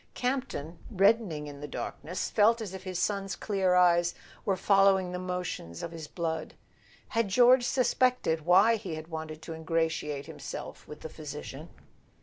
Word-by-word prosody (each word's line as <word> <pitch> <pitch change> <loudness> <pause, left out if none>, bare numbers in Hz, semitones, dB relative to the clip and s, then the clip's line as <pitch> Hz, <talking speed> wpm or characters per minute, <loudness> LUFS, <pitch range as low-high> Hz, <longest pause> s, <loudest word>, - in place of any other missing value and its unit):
Campton, 250 - -3
reddening 195 -6 +2
in 145 -1 -9
the 145 - -5
darkness, 175 +5 -4
felt 225 +2 +4
as 210 -4 -6
if 190 - -7
his 185 -1 -3
son's 195 0 -1
clear 190 -3 +1
eyes 175 -1 +4 0.3
were 195 - +2
following 195 -2 +4
the 180 - -4
motions 180 - -4
of 170 - -4
his 160 -2 -7
blood. 160 -2 -3 0.5
Had 230 -2 +1
George 245 +5 +6
suspected 250 - +1
why 200 +6 +6
he 185 -6 -5
had 155 +1 -8
wanted 160 -1 -6
to 165 - -7
ingra¬ 165 0 0
tiate 150 -3 -4
himself - - -8
with 150 - -10
the - - -5
physician? 150 0 -8
180 Hz, 160 wpm, -29 LUFS, 160-205 Hz, 0.5 s, George